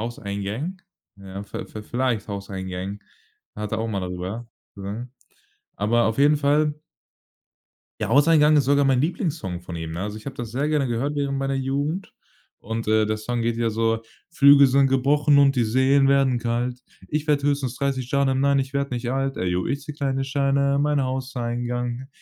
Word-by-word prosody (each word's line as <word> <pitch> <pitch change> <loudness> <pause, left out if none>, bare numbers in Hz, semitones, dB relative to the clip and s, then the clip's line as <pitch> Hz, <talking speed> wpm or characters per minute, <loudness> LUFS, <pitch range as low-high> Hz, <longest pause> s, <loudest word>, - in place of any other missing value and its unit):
Hauseingang, 115 - -4 0.4
ja. 100 0 -8
V-v 105 +1 -7
vielleicht: 120 -1 -1
Hauseingang. 95 0 -5 0.6
Hat 105 0 -5
er 110 - 0
auch 115 - -2
mal 100 -3 -2
darüber 90 +6 -5 0.3
gesungen. 105 +6 -6 0.7
Aber 115 +3 +2
auf 110 +1 0
jeden 145 +1 +5
Fall 150 +1 +2 1.3
Ja, - - -1
„Hauseingang“ 150 +3 +5
ist 140 - +3
sogar 140 +1 +3
mein 135 -2 +3
Lieblingssong 140 - -2
von 85 -1 -8
ihm, 80 -1 -5
ne? 85 - -5
Also, 105 +1 -4
ich 110 - -13
habe 135 - -6
das 120 -3 -5
sehr 135 +6 -1
gerne 150 -4 +1
gehört 120 +5 -1
während 140 -1 -1
meiner 135 0 -1
Jugend 140 +7 -2 0.5
und, 115 +1 -5
äh, 110 0 +3
der 110 0 -1
Song 120 +2 -3
geht 115 0 0
ja 115 -1 +1
so: 115 0 0 0.3
„Flügel 140 -3 +7
sind 135 +1 +4
gebrochen 140 +2 +3
und 140 -1 +5
die 125 - +2
Seen 130 +4 +3
werden 135 -3 +3
kalt. 120 +2 -2 0.3
Ich 150 +1 -2
werde 145 -2 +2
höchstens 140 -4 0
30 135 -3 -2
Jahre, 140 -1 +2
nein, 140 +1 +3
ich 135 0 -2
werd 140 0 -1
nicht 125 0 -3
alt. 135 +1 -1
Eyo, 90 0 -1
ich 140 +1 -2
zähle 150 0 -8
kleine 135 -2 -1
Scheine 140 0 +1
in 140 - +2
mein 150 -1 +2
Hauseingang. 125 -1 -3
130 Hz, 180 wpm, -23 LUFS, 110-140 Hz, 1.3 s, Flügel